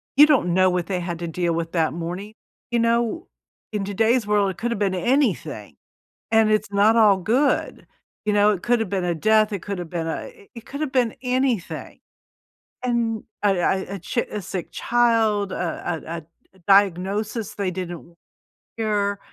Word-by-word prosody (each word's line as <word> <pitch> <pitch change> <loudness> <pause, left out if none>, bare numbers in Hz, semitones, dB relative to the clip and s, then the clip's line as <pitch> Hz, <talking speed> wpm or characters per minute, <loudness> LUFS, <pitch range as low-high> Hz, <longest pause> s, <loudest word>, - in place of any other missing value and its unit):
you 290 +2 +9
don't 255 - +3
know 185 +1 +4
what 180 -1 -1
they 185 -2 -1
had 170 -1 -4
to 170 - -4
deal 170 +1 -1
with 165 0 -3
that 160 -3 +1
morning. 180 +5 -5 0.4
You 240 - +2
know, 235 - +1 0.5
in 205 - -1
today's 225 +3 +1
world, 205 -2 +2
it 185 - -11
could 240 +1 -2
have 235 - -2
been 195 -2 +1
anything, 260 +10 0 0.6
and 220 -1 +5
it's 215 -1 0
not 205 +3 +4
all 210 -3 +6
good. 245 +10 0 0.4
You 210 - +1
know? 205 0 +5
It 190 -4 -2
could've 235 -4 +1
been 190 -2 -1
a 175 -1 0
death, 215 +5 +3
it 200 -4 -3
could've 180 -5 -5
been 165 -2 -3
a 160 - -4
eh 200 - -19
it 230 - -10
could 280 +2 -7
have 300 -4 -2
been 245 -4 +1
anything. 250 -6 -1 0.8
An 235 -3 0 0.2
a 200 -2 +3
a 190 +1 0
a 195 - -7
chi 235 +7 -1
a 210 - -3
sick 180 -1 -5
child, 225 -4 +2
a 170 -1 -3
a 170 +1 -4 0.4
a - - -23
diagnosis 200 +3 +2
they 195 -2 -1
didn't 175 -2 -5
wa 170 - -20 0.6
hear. 205 -2 0
205 Hz, 185 wpm, -23 LUFS, 180-230 Hz, 0.8 s, you